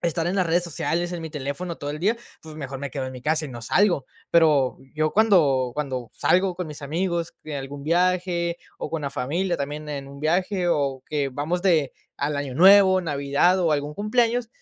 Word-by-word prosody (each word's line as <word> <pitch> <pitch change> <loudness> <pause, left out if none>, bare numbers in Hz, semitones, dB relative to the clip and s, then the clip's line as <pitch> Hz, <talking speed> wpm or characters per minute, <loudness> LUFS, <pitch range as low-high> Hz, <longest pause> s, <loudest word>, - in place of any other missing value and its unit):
estar 170 0 0
en 190 - -1
las 185 -2 +2
redes 175 +2 +2
sociales, 175 +1 -2
en 175 - -4
mi 160 - -5
teléfono 150 +4 -4
todo 145 - -5
el 150 - -5
día, 210 +7 +1 0.2
pues, 155 -1 -11
mejor 140 -3 -6
me 140 0 -4
quedo 135 -1 -4
en 130 - -6
mi 125 - -9
casa 155 +1 +1
y - - -6
no 120 -2 -8
salgo. 175 - +2 0.2
Pero, 150 -6 +4 0.2
yo 155 0 +1
cuando 150 - +3
cuando 130 -5 -3
salgo 185 0 +2
con 180 -2 -5
mis 150 0 -8
amigos 170 +3 -2
en 150 -2 -5
algún 140 +1 -7
viaje, 175 +1 +1 0.2
o - - -4
con 165 -2 -3
la 140 - -2
familia 170 +7 -1
también 150 +2 -5
en 140 -2 -5
un 140 +1 -11
viaje, 180 +3 0
o 140 -5 0
que 145 -2 0
vamos 150 +7 -2
de 160 -8 +2 0.2
al 145 +1 -1
Año 140 -2 -4
Nuevo, 190 +3 +7
Navidad 145 +3 +2
o 170 -4 +2
algún 145 0 -1
cumpleaños, 235 +2 +1
155 Hz, 210 wpm, -24 LUFS, 140-180 Hz, 0.2 s, Nuevo